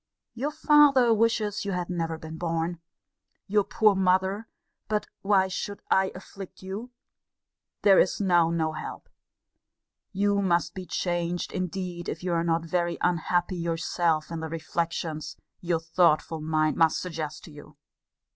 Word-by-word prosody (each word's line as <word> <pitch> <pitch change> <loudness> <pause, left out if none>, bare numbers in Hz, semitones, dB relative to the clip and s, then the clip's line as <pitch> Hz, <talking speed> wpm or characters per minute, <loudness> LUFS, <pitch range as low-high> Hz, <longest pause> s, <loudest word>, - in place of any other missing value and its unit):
Your 260 +5 -2
father 295 -5 +5
wishes 220 -2 +1
you 200 -1 -2
had 180 -1 -2
never 165 -3 -2
been 160 0 -9
born. 165 0 -2 0.7
Your 205 +1 +2
poor 215 +1 +3
mother 190 +3 +1 0.4
but 210 -1 0 0.2
why 195 -1 +3
should 200 +2 -5
I 190 0 +3
afflict 190 0 -10
you? 200 +6 -6 0.9
There 195 -2 +7
is 185 - +2
now 175 -4 +3
no 160 -1 0
help! 155 - -7 1.0
You 200 0 +1
must 175 -3 +1
be 185 -1 -7
changed, 175 -1 -2
indeed, 180 -1 -4
if - - -5
you 180 -1 -1
are 165 0 +1
not 165 0 0
very 170 +1 -1
unhappy 175 +1 +1
yourself 165 -1 0
in 165 - -3
the 160 0 -5
reflections 165 -1 -3 0.2
your 170 -2 0
thoughtful 165 -1 +2
mind 155 0 +1
must 165 -2 +3
suggest 160 -4 -5
to 160 - -11
you. 145 0 -14
175 Hz, 145 wpm, -27 LUFS, 165-195 Hz, 1.0 s, There